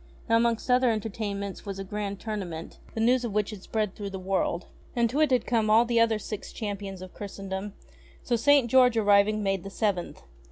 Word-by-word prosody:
Now 230 Hz, -, +3 dB
amongst 235 Hz, +1 st, +1 dB
other 250 Hz, 0 st, +4 dB
entertain 215 Hz, -2 st, -2 dB
ments 200 Hz, -1 st, -6 dB
was 195 Hz, -2 st, -5 dB
a 195 Hz, -, -4 dB
grand 200 Hz, 0 st, -4 dB
tournament, 185 Hz, -7 st, -5 dB, 0.2 s
the -, -, -2 dB
news 245 Hz, +3 st, +3 dB
of 230 Hz, -4 st, -3 dB
which 210 Hz, 0 st, +1 dB
had 210 Hz, -3 st, -8 dB
spread 210 Hz, -1 st, -2 dB
through 205 Hz, -1 st, -6 dB
the 195 Hz, -, -6 dB
world. 185 Hz, -2 st, -1 dB, 0.3 s
And 235 Hz, -1 st, +3 dB
to 285 Hz, -, -1 dB
it 305 Hz, -, +4 dB
had 255 Hz, -2 st, +2 dB
come 225 Hz, -3 st, +1 dB
all 225 Hz, +2 st, +6 dB
the 235 Hz, -1 st, +2 dB
other 230 Hz, -1 st, +3 dB
Six 210 Hz, -1 st, -6 dB
Champions 200 Hz, -3 st, -5 dB
of 185 Hz, -, -11 dB
Christendom; 195 Hz, 0 st, -6 dB, 0.5 s
so 240 Hz, -, +1 dB
St. 275 Hz, +2 st, +4 dB
George 250 Hz, -1 st, +5 dB
arriving 205 Hz, 0 st, +4 dB
made 195 Hz, -2 st, 0 dB
the 195 Hz, -, -6 dB
Seventh. 195 Hz, -3 st, -2 dB
210 Hz, 210 wpm, -27 LUFS, 195-230 Hz, 0.5 s, all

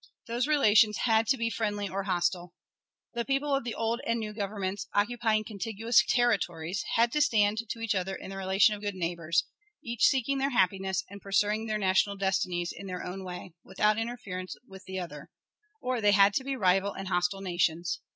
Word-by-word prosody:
Those 240 Hz, +3 st, -1 dB
relations 220 Hz, -7 st, +4 dB
had 225 Hz, -1 st, +3 dB
to 270 Hz, -, +3 dB
be 230 Hz, -1 st, -1 dB
friendly 205 Hz, -3 st, -2 dB
or 195 Hz, +1 st, -4 dB
hostile. 175 Hz, -1 st, -1 dB, 0.6 s
The 235 Hz, 0 st, -1 dB
people 275 Hz, +3 st, 0 dB
of 275 Hz, -, +1 dB
the 235 Hz, -2 st, -4 dB
old 230 Hz, +1 st, -1 dB
and 230 Hz, 0 st, 0 dB
new 215 Hz, -1 st, -5 dB
Governments, 200 Hz, -2 st, -3 dB
occupying 220 Hz, 0 st, +1 dB
contiguous 225 Hz, +3 st, +1 dB
territories, 190 Hz, -7 st, 0 dB
had 230 Hz, +1 st, +3 dB
to 300 Hz, -, +1 dB
stand 215 Hz, -4 st, +3 dB
to 230 Hz, -, -4 dB
each 225 Hz, -1 st, 0 dB
other 190 Hz, 0 st, -2 dB
in 190 Hz, -, -8 dB
the 195 Hz, -, -6 dB
relation 195 Hz, +2 st, +3 dB
of 205 Hz, -, -7 dB
good 205 Hz, -2 st, -3 dB
neighbors, 170 Hz, -2 st, 0 dB, 0.4 s
each 235 Hz, -1 st, +1 dB
seeking 270 Hz, 0 st, +1 dB
their 275 Hz, +1 st, +1 dB
happiness 190 Hz, -4 st, +1 dB
and 200 Hz, +1 st, -11 dB
pursuing 210 Hz, +2 st, 0 dB
their 215 Hz, -1 st, -1 dB
national 195 Hz, 0 st, +2 dB
destinies 185 Hz, -3 st, -1 dB
in 195 Hz, -, -8 dB
their 180 Hz, -1 st, -5 dB
own 190 Hz, +2 st, -6 dB
way, 180 Hz, -1 st, -8 dB
without 210 Hz, +3 st, +1 dB
interference 220 Hz, -6 st, -5 dB
with 190 Hz, -3 st, -12 dB
the 190 Hz, 0 st, -6 dB
other; 180 Hz, -2 st, -7 dB, 0.5 s
or 250 Hz, -2 st, -1 dB
they 205 Hz, -1 st, +4 dB
had 200 Hz, 0 st, +6 dB
to 265 Hz, -, 0 dB
be 270 Hz, 0 st, -3 dB
rival 195 Hz, -2 st, +2 dB
and 195 Hz, 0 st, -6 dB
hostile 180 Hz, +2 st, 0 dB
nations. 175 Hz, -2 st, 0 dB
205 Hz, 190 wpm, -29 LUFS, 190-230 Hz, 0.6 s, had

